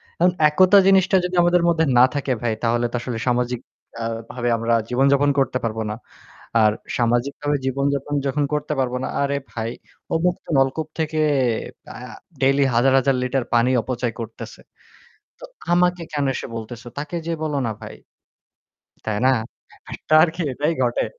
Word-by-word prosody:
এখন 180 +1 +3 0.2
একতা 185 +6 +5
জিনিসটা 190 -1 +4
যদি 180 0 -3
আমাদের 175 0 +3
মধ্যে 160 -1 +2
না 125 - +8
থাকে 140 -2 -2
ভাই 120 -2 0
তাহলে 120 +1 +1
তো - - -4
আসলে 120 -2 -4
সামাজিক 125 -1 0 0.4
আ - - -2 0.3
ভাবে 120 -1 -2
আমরা 115 +1 0 0.2
জীবনযাপন 140 +3 +3
করতে 130 -1 +1
পারবো 110 -1 -2
না। 105 - -4 0.7
আর 105 - +5 0.3
সামাজিকভাবে 125 +5 0
জীবনযাপন 140 +2 -1
যখন 145 +2 0
করতে 150 +1 -1
পারবো 125 -1 0
না, - - -2
আরে 140 0 0
ভাই 115 0 -4 0.4
ও - - 0
মুক্ত 180 0 -1
নলকূপ 135 +4 +1
থেকে 155 0 -1 0.7
ব্যা - - -10 0.4
ডেইলি 135 +1 +3
হাজার-হাজার 135 +2 +3
লিটার 125 -1 -1
পানি 120 +2 +3
অপচয় 120 -1 -3
করতেছে। 115 0 -9 0.8
তো - - -15 0.3
আমাকে 180 0 +2
কেন 145 -1 0
এসে - - -5
বলতেছে? 115 +2 -8
তাকে 150 +4 -5
যেয়ে 165 -1 -3
বলো 150 -2 -1
না 110 - -2
ভাই। - - -9 1.1
তাই 105 -1 -2
না? - - +6 0.6
একটা 155 - -1
আরকি 170 +1 0
এটাই 150 +5 0
ঘটে। 120 -1 +1
135 Hz, 160 wpm, -22 LUFS, 120-150 Hz, 1.1 s, না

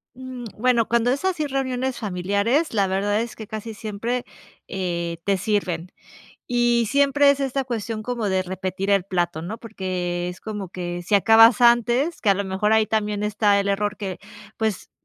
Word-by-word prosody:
Mm, 255 -2 -8
bueno, 235 -1 +2
cuando 235 +1 +2
es 280 +8 -1
así 335 -6 0
reuniones 260 -1 -2
familiares, 205 - 0
la 200 -2 +2
verdad 205 +3 0
es 235 - -5
que, 220 -2 -9
casi 220 0 -6
siempre, 230 +3 -3 0.4
eh, 170 -3 -3
te 200 -1 +2
sirven 185 -4 -2 0.6
y 240 -1 +2
siempre 280 +1 +4
es 280 - +1
esta 275 0 -1
cuestión 225 -3 -4
como 235 -3 -2
de 190 -1 +1
repetir 190 +1 -3
el 195 -2 +3
plato, 175 -4 -1
¿no?, 195 +7 -5
porque 180 -5 -3
es 180 - -8
como 210 -4 -5
que 175 -1 -5
si 210 - +1
acabas 225 +3 +6
antes, 240 +6 +3
que 210 - 0
a - - +5
lo 200 +1 -2
mejor, 190 +3 0
ahí 220 -1 +4
también 210 -1 -1
está 205 -1 +2
el 200 - -2
error 205 +1 0
que, 190 -3 -5 0.4
pues, 220 -3 -2
210 Hz, 180 wpm, -23 LUFS, 190-240 Hz, 0.6 s, acabas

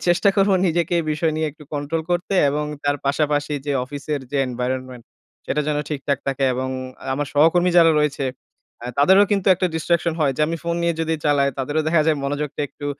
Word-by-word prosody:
চেষ্টা 175 +4 +3
করব 195 +1 +3 0.2
নিজেকে 170 0 0
এই 165 - -5
বিষয় 155 +1 0
নিয়ে 155 - 0
একটু 150 +1 -17
কন্ট্রোল 145 +3 -2
করতে 175 +2 -1 0.2
এবং 150 +1 -1 0.2
তার 145 0 +1
পাশাপাশি 145 0 0
যে 145 - 0
অফিসের 145 +2 -4
যে 145 - -1
environment 125 0 -4 0.5
সেটা 150 - 0
যেন 150 - 0
ঠিকঠাক 140 -2 -2
থাকে 135 0 0
এবং 130 +1 -2 0.5
আমার 145 +2 -2
সহকর্মী 165 +4 +4
যারা 165 -1 +6
রয়েছে, 145 -2 0 0.6
অ্যা 120 - -6
তাদেরও 190 +7 +6
কিন্তু 195 -2 0
একটা 185 +1 0
distraction 170 +1 0
হয়। 145 -3 +2
যে - - -3
আমি 165 +1 -2
ফোন 170 0 -1
নিয়ে 170 0 +1
যদি 160 0 0
চালাই, 140 -2 +3
তাদেরও 145 +4 -1
দেখা 160 -1 +3
যায় 155 -2 +3
মনোযোগটা 145 +1 -3
একটু 145 - -8
150 Hz, 195 wpm, -21 LUFS, 140-165 Hz, 0.6 s, যারা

